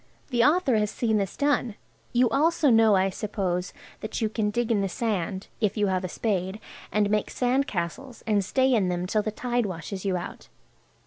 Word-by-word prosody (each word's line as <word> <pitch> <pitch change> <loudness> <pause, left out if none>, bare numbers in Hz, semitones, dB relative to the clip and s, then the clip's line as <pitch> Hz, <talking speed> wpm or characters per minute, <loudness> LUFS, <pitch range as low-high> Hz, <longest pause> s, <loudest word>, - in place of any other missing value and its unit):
The 240 -2 +3
author 295 -5 +3
has 210 -1 +1
seen 220 -1 0
this 195 -3 -2
done. 280 -6 +1 0.4
You 245 +1 +4
also 305 -1 +3
know, 225 -2 +6
I 190 0 +2
suppose, 185 -3 -2 0.3
that 215 - -4
you 220 - 0
can 215 -1 0
dig 235 +2 -1
in 210 -3 +2
the 195 - -1
sand 195 -3 -2
(if 210 -1 0
you 210 - +2
have 185 0 -1
a 185 - -3
spade) 190 -1 -2 0.3
and 210 -1 +2
make 210 -1 +1
sand 260 +3 +1
castles, 220 +8 -4
and 210 -3 +2
stay 260 +6 +2
in 200 -6 +2
them 180 0 -1
till 210 +3 +1
the 215 - -2
tide 240 +1 -1
washes 185 +1 -6
you 190 -2 0
out. 175 - -8
215 Hz, 200 wpm, -26 LUFS, 190-240 Hz, 0.4 s, know